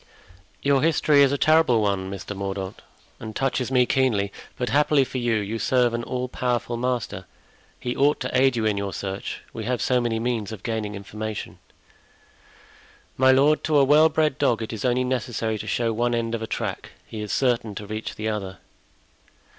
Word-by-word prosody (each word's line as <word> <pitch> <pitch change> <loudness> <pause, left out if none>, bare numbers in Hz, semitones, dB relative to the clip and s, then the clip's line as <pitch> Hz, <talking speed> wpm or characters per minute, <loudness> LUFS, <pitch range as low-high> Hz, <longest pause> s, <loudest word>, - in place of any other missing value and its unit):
"Your 140 -1 +3
history 155 -2 +4
is 140 -1 +5
a 140 - +1
terrible 155 -6 +4
one, 100 -3 0
Mr. 100 +1 -6
Mordaunt, 95 0 -5 0.4
and 110 -1 -8
touches 130 -2 0
me 125 -1 +4
keenly; 115 -7 +1 0.3
but 125 -2 -2
happily 145 +2 +3
for 130 0 -4
you, 120 -2 +1
you 110 +1 -2
serve 125 -1 +2
an 120 - -1
all 125 0 -3
powerful 125 -1 -2
master; 125 0 -2 0.5
he 125 0 -3
ought 145 +2 +3
to 125 - -3
aid 130 0 +4
you 115 -2 -1
in 105 -2 +1
your 100 -2 -3
search; 95 -1 -5
we 110 - -5
have 125 0 -1
so 125 -1 +2
many 115 -2 -1
means 115 -3 -2
of 110 -3 -8
gaining 110 -3 -3
information." 105 +2 -6 1.6
"My 130 0 +5
lord, 145 +3 +4
to 155 -1 +2
a 140 - +6
well 150 +3 +6
bred 155 -4 0
dog 115 -2 +2
it 110 - -6
is 110 - -5
only 125 0 +2
necessary 120 -3 -2
to 110 - -6
show 115 +1 0
one 120 +2 0
end 115 0 -2
of 115 - -2
a 110 - -4
track; - - -4
he 110 - -7
is 105 - -5
certain 120 -5 0
to 105 - -6
reach 110 +1 -5
the 110 - -4
other." 100 -3 -3
120 Hz, 195 wpm, -24 LUFS, 110-130 Hz, 1.6 s, a